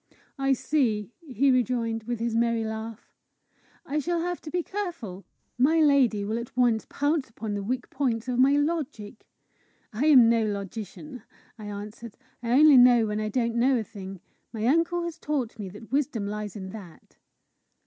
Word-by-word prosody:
"I 270 0 +3
see," 235 -7 0 0.2
he 265 +3 +3
rejoined, 235 -3 0
with 240 -1 -3
his 230 0 -1
merry 230 -1 +1
laugh, 220 0 -6 0.7
"I 300 +2 -1
shall 340 +3 -1
have 355 +1 -3
to 310 - -8
be 355 +2 -1
careful! 325 - -5 0.3
My 310 +6 +4
lady 265 -9 +3
will 220 +3 -2
at 235 +1 -9
once 235 -3 +2
pounce 290 -1 0
upon 220 -1 -5
the 205 - -2
weak 245 +5 -3
points 250 -4 -1
of 250 -1 -1
my 270 +2 +5
logic!" 290 -8 -2 0.7
"I 255 +8 0
am 260 -6 +8
no 230 -1 +3
logician," 215 - -6 0.4
I 215 - -8
answered; 210 +2 -8 0.2
"I 235 - -4
only 295 +1 +7
know 245 -2 +7
when 210 0 -2
I 215 0 -2
don't 235 +1 0
know 250 +3 +3
a 225 - -1
thing. 195 -4 -9 0.3
My 220 -1 -3
uncle 335 +6 +2
has 340 -1 -5
taught 260 -7 -3
me 200 -2 -5
that 210 +5 -13
wisdom 265 -6 0
lies 210 0 -5
in 190 -2 -7
that." 190 -6 -12
235 Hz, 175 wpm, -26 LUFS, 215-280 Hz, 0.7 s, am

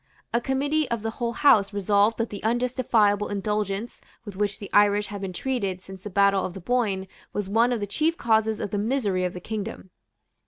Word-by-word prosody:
A 235 - +2
committee 285 +4 0
of 235 -2 -2
the 225 - -2
whole 235 +1 -3
House 215 -7 +4
resolved 205 +2 +2
that 230 0 -2
the 205 - -6
unjustifiable 230 -3 +2
indulgence 205 +2 -2 0.2
with 205 -3 -8
which 205 0 -1
the 200 -3 -9
Irish 205 0 +4
had 205 -1 -6
been 195 -1 -4
treated 195 -3 -2
since 190 -1 -11
the 210 - -7
battle 200 0 +3
of 180 - -4
the - - -6
Boyne 200 -2 0 0.3
was 205 -2 -2
one 230 +5 +3
of 240 - 0
the 205 - -2
chief 310 - 0
causes 220 -1 +2
of 200 - -4
the 205 - -1
misery 205 -5 0
of 180 - -2
the 180 - -6
kingdom. 210 -1 -6
210 Hz, 205 wpm, -25 LUFS, 200-235 Hz, 0.3 s, House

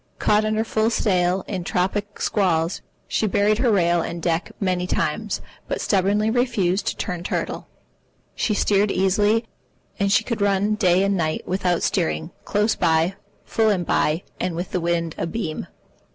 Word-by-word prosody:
Caught 210 +1 +2
under 215 +1 +1
full 220 0 +1
sail 185 -4 +1
in 185 -4 -3
tropic 200 +4 -2
squalls, 170 -4 +1 0.3
she 215 - 0
buried 205 +2 +2
her 250 -1 +3
rail 175 -4 +3
and 170 +1 -4
deck 165 +1 -1
many 180 -2 0
times, - - -1 0.3
but - - -2
stubbornly 205 +2 +2
refused 220 -6 +1
to - - -1
turn 180 -3 -3
turtle. 175 - -3 0.7
She 210 - 0
steered 205 0 +2
easily, 205 +4 +2 0.5
and 200 -1 +1
she 205 +2 +4
could 225 -2 -3
run 200 +1 +2
day 190 -3 +3
and 200 0 +1
night, 155 -3 -2
without 180 -2 0
steering, 80 0 0
close 210 +2 +1
by, 165 +1 +2 0.3
full 220 -1 +2
and 185 -4 +1
by, 155 +3 +1 0.2
and 180 -2 -2
with 175 +2 -4
the 180 - -1
wind 170 -1 0
abeam. 165 -3 -3
195 Hz, 160 wpm, -23 LUFS, 175-210 Hz, 0.7 s, she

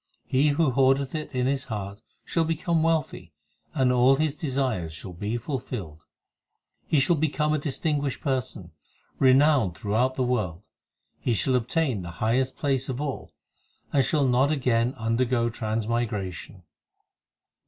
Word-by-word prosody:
He 135 +3 +2
who 145 -1 +2
hoardeth 135 +1 +2
it 155 -1 -4
in 125 -2 -1
his 135 0 0
heart 100 -3 -6 0.2
shall 165 - +1
become 165 +1 0
wealthy, 155 - -1 0.4
And 130 -3 +3
all 125 +2 +5
his 150 0 0
desires 130 - -2
shall 85 +4 -9
be 105 +7 -3
fulfilled; 110 - -6 0.8
He 150 - +3
shall 135 +6 +3
become 150 0 0
a 155 - +1
distinguished 145 -1 -1
person, 125 - -2 0.5
renowned 130 - +4
through 100 +3 -4
out 130 +4 +2
the 130 - 0
world; 105 -7 -2 0.5
He 120 - 0
shall 130 +5 +1
obtain 125 - 0
the 85 - -7
highest 130 +4 0
place 135 -2 0
of 130 0 -3
all, 145 -2 -5 0.6
And 140 - +4
shall 140 +2 +2
not 130 +3 +3
again 125 -3 +1
undergo 115 +1 +1
transmigration. 110 -5 -3
130 Hz, 145 wpm, -26 LUFS, 110-140 Hz, 0.8 s, all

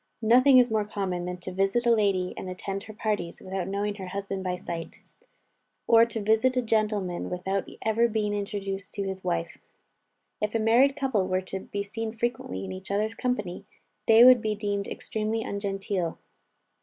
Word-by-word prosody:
Nothing 255 +4 +6
is 245 -2 +5
more 215 -1 +2
common 195 -4 -3
than 180 0 -4
to 185 - -6
visit 195 +6 +1
a 235 - +5
lady, 200 -5 +2
and 185 - -6
attend 195 +2 -4
her 215 - -9
parties, 210 -5 -2
without 190 -1 -4
knowing 200 +1 -1
her 190 -2 -6
husband 195 0 -4
by 180 -1 -1
sight; 170 -2 -7 0.8
or 230 0 +6
to 230 - -4
visit 220 +5 +2
a 250 - +2
gentleman 210 -5 0
without 190 +2 -2
ever 225 +2 +3
being 215 -2 -1
introduced 200 -1 -4
to 200 - -2
his 190 -1 -5
wife. 170 -2 -2 0.8
If 210 +1 -1
a - - +3
married 240 +5 +4
couple 250 -10 0
were 185 0 0
to 190 +1 -6
be 200 +1 -4
seen 220 +2 -5
frequently 225 - -3
in 95 - -6
each 95 0 -8
other's 210 +2 0
company, 210 -6 -3 0.4
they 225 +1 +8
would 250 -1 +8
be 215 -1 -1
deemed 205 -1 -2
extremely 220 +1 -3
ungenteel. 195 -4 -2
205 Hz, 180 wpm, -27 LUFS, 190-225 Hz, 0.8 s, they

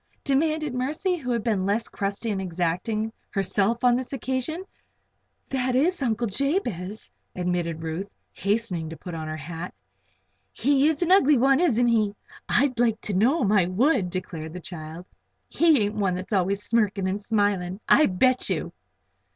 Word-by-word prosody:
demanded 305 +1 +1
Mercy, 305 +9 -1
who 275 -8 -6
had 235 -3 0
been 210 -5 0
less 205 +4 0
crusty 200 +3 -3
and 195 -2 -2
exacting 185 +5 -2 0.2
herself 200 +4 0
on 245 -1 +5
this 255 0 -3
occasion. 265 +5 -3 0.9
"That 255 -1 0
is 325 +6 +2
Uncle 235 -2 0
Jabez;" 220 - -2 0.2
admitted 175 -2 -2
Ruth, 165 +5 -5 0.2
hastening 200 -5 -1
to 165 - -8
put 175 +4 -8
on 160 -1 -5
her 155 0 -4
hat. 165 +4 -7 0.8
"He 280 +1 +2
is 315 +2 +1
an 350 - 0
ugly 300 -7 +6
one; 270 +3 +4
isn't 245 -9 +3
he? 215 -3 +2 0.3
I'd 255 -1 +2
like 225 -3 +2
to 210 - -4
know 245 - +3
him, 200 - +2
I 190 -5 +4
would," 210 - +2
declared 165 -4 -5
the - - -6
odd 180 - -10
child. 165 0 -8 0.4
"He 320 -7 +4
ain't 205 +1 -1
one 195 -4 0
that's 185 +4 -5
always 200 +1 +1
smirking 210 -4 +1
and 195 +2 -2
smiling, 205 -4 0
I 305 - +6
bet 255 +7 +2
you!" - - -2
215 Hz, 165 wpm, -25 LUFS, 185-260 Hz, 0.9 s, ugly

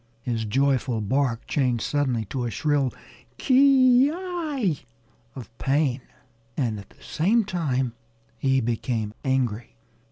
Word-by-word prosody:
His 115 -3 -2
joyful 130 0 +1
bark 120 +2 0
changed 125 -5 0
suddenly 130 -6 0
to 125 +4 -3
a - - -1
shrill 145 0 0 0.5
ki 260 -1 +5
yi 310 - -2 0.5
of 115 -4 -10
pain. 135 -2 +1 0.6
And 115 -7 -1
at 100 - -13
the - - -21
same 210 +8 +1
time 135 - -1 0.5
he 135 -1 +2
became 115 -2 -2
angry. 125 -4 -1
135 Hz, 120 wpm, -25 LUFS, 120-175 Hz, 0.6 s, ki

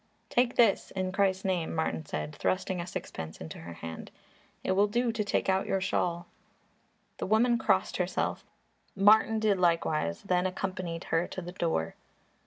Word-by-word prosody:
"Take 245 0 +2
this 230 -5 +4
in 185 -1 -2
Christ's 190 -1 +1
name," 175 -4 -1
Martin 80 - -2
said, 75 0 -4
thrusting 185 -1 -1
a 170 - -6
sixpence 80 - -6
into 80 - -8
her 85 +1 -8
hand. 80 -1 -8 0.5
"It - - 0
will 200 +2 +4
do 240 +3 +1
to 220 -1 -1
take 205 - 0
out 190 0 +1
your 195 - +1
shawl." 175 -2 -1 0.9
The - - -2
woman 235 +3 +3
crossed - - +1
herself, - - -1 0.5
Martin 215 +3 +5
did 215 -3 +2
likewise, 160 - +1
then 180 0 +1
accompanied 185 -3 -4
her 165 +2 0
to 185 - -6
the 175 - -6
door. 160 - -1
185 Hz, 165 wpm, -29 LUFS, 165-200 Hz, 0.9 s, Martin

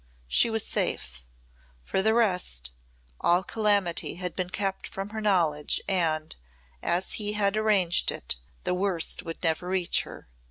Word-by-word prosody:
She 230 - +4
was 225 -1 -1
safe. 60 -1 -3 0.6
For 190 - 0
the 220 +3 +3
rest, 180 - 0 0.5
all 175 +2 +3
calamity 205 -5 +1
had 180 0 -5
been 180 -1 -2
kept 195 0 -2
from 195 +1 -6
her 220 0 -5
knowledge 165 -8 +2
and, 160 -5 0 0.5
as 175 +2 0
he 210 -1 -1
had 205 -1 +1
arranged 205 -5 +3
it, - - -3 0.3
the - - 0
worst 180 -2 0
would 165 +1 -8
never 165 +1 0
reach 185 -1 +2
her. - - -11
185 Hz, 150 wpm, -27 LUFS, 165-205 Hz, 0.6 s, She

